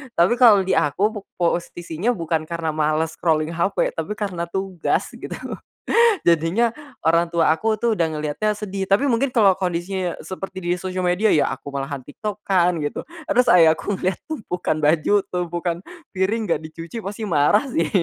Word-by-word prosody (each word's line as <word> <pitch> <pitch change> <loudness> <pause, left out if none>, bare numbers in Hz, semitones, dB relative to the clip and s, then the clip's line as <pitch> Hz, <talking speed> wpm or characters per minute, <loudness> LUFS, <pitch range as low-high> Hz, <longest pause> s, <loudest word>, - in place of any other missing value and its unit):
tapi 175 +6 +4
kalo 215 -6 +7
di 190 - -2
aku 190 +9 +1
po 210 - -7 0.2
posisinya 175 +3 -1
bukan 165 -3 -1
karena 165 -2 -2
malas 155 +1 0
scrolling 155 -1 +1
HP 170 +4 0
tapi 165 +6 -3
karena 185 -5 -3
tugas 190 -1 -2
gitu. - - -7 0.9
Jadinya, 170 +8 +3 0.3
orang 165 +1 +3
tua 165 -2 +3
aku 220 +7 0
tuh 230 +1 +1
udah 165 -3 +2
ngeliatnya 155 +8 -1
sedih 195 -2 -4
tapi 200 +8 +3
mungkin 260 +4 +2
kalau 205 -5 +6
kondisinya 180 0 -2
seperti 190 -1 -7
di 175 - +1
sosial 185 -1 -3
media 180 +5 +2
ya 150 - +2
aku 135 +2 -8
malahan 140 0 -3
TikTok-an 185 -2 0
gitu, 145 - -3 0.2
terus 250 -4 +3
ayahku 170 +3 +4
lihat 185 0 0
tumpukan 180 - -2
baju 155 +6 +3
tumpukan 175 -1 -2 0.4
piring 205 +5 +1
gak 165 - +1
dicuci 165 +7 -8
pasti 205 +3 -5
marah 150 - +3
sih. 165 -9 0
180 Hz, 160 wpm, -22 LUFS, 165-205 Hz, 0.9 s, kalo